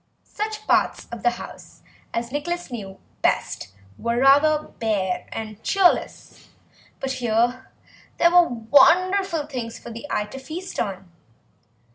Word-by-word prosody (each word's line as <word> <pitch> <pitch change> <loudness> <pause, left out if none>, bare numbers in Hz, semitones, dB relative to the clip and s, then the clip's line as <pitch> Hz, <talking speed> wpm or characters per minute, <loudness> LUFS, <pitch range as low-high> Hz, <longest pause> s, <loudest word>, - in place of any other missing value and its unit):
Such 430 0 -4
parts - - +2
of 235 - -6
the 240 - +4
house - - -11 0.3
as 235 +1 -3
Nicholas 345 +3 -3
knew 195 -5 -7 0.2
best 95 - 0 0.3
were 235 0 -1
rather 295 +3 +4
bare 200 -5 -1
and 215 -1 -6
cheerless, 390 -3 +1 0.5
but 270 - -2
here 245 0 0 0.5
there 340 - +5
were 355 -1 +6
wonderful 330 - +3
things 245 -5 -5
for 235 - -10
the 230 +5 -8
eye 210 - 0
to 270 +6 -9
feast 330 +7 -7
on. 195 -3 -3
260 Hz, 130 wpm, -23 LUFS, 225-335 Hz, 0.5 s, were